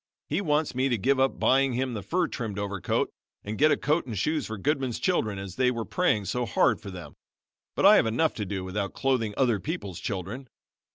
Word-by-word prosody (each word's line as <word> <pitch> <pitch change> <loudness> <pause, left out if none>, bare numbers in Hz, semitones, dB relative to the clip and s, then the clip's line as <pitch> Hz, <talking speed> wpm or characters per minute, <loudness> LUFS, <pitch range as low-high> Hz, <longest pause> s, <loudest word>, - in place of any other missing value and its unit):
He 155 +7 0
wants 150 -5 +1
me 130 +2 +1
to 120 - +1
give 130 +6 +2
up 135 0 +1
buying 135 0 +3
him 130 +1 -1
the 105 - -4
fur 175 - 0
trimmed 110 -5 -5
overcoat 100 -2 -1 0.3
and 105 +2 -4
get 150 +7 +4
a - - +3
coat 150 -1 0
and 110 -4 -4
shoes 155 +10 0
for 110 - -5
Goodman's 135 +1 -1
children, 110 - 0
as 95 -1 -7
they 130 -1 +3
were 115 -3 -3
praying 115 - +1
so 120 +5 -1
hard - - +2
for 100 - -8
them, 90 -6 -10 0.6
but - - +1
I - - +9
have - - +3
enough 125 +8 +1
to 105 - -2
do 95 -1 -3
without 95 +1 -3
clothing 125 -6 0
other 120 -6 +2
people's 100 - -5
children. 100 +7 -5
120 Hz, 220 wpm, -27 LUFS, 100-135 Hz, 0.6 s, I